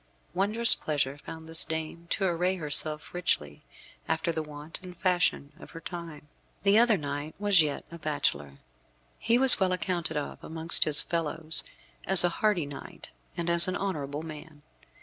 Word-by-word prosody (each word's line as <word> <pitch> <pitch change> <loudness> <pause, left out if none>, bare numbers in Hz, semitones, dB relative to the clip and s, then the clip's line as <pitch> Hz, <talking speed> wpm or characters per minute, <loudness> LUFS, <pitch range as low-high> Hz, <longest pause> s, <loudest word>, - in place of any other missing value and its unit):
Wondrous 210 +5 +7
pleasure 145 -2 -3
found 160 +2 -10
this 165 0 -1
dame 160 +1 -6
to 195 - -1
array 180 +1 0
herself 150 -2 -3
richly, 75 - -2 0.5
after 160 +1 -1
the 160 - -3
wont 150 +1 -10
and 180 -1 -11
fashion 180 -6 0
of - - -13
her - - -6
time. 165 -4 -9 0.4
The 200 +2 +4
other 235 -3 +4
knight 145 0 -6
was 200 -3 +3
yet 150 -2 -3
a 170 - -10
bachelor. 75 - -2 0.6
He 230 +1 +2
was 265 0 +7
well 190 -2 +1
accounted 180 -3 -2
of 145 - -6
amongst 165 +1 +2
his 150 -2 +4
fellows 160 -1 -2 0.4
as 190 -3 +6
a 175 - +3
hardy 210 -7 +1
knight 140 -1 -10 0.3
and 170 - -3
as 170 0 +4
an 185 - -2
honourable 150 -7 -4
man. 155 -1 -11
165 Hz, 165 wpm, -27 LUFS, 150-180 Hz, 0.6 s, Wondrous